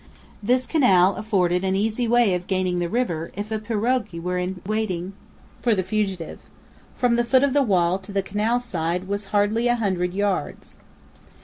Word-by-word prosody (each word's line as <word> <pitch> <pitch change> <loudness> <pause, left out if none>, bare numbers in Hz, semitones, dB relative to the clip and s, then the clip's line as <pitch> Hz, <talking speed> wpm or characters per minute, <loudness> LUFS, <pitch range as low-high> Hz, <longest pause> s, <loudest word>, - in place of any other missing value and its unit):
This 250 +4 +1
canal 195 - +4
afforded 185 -5 0
an 190 0 +1
easy 220 +4 0
way 235 -4 +4
of 180 0 -3
gaining 185 -2 0
the 175 -1 -1
river 170 -9 -2
if 205 +2 -5
a 220 - -1
pirogue 225 +1 -1
were 180 +1 -2
in 180 +1 -3
waiting 195 -3 -2 0.5
for 235 -3 +2
the 190 - 0
fugitive. 195 -4 -3 0.6
From 240 -2 +2
the 240 - +3
foot 260 +3 +3
of 280 -2 +2
the 290 - +4
wall 185 -6 +2
to 195 +2 -11
the 195 -1 0
canal 215 +5 0
side 180 -5 -3
was 200 +1 -3
hardly 205 +4 +1
a 240 - +3
hundred 185 -5 -1
yards. 200 -1 -2
205 Hz, 180 wpm, -23 LUFS, 180-230 Hz, 0.6 s, canal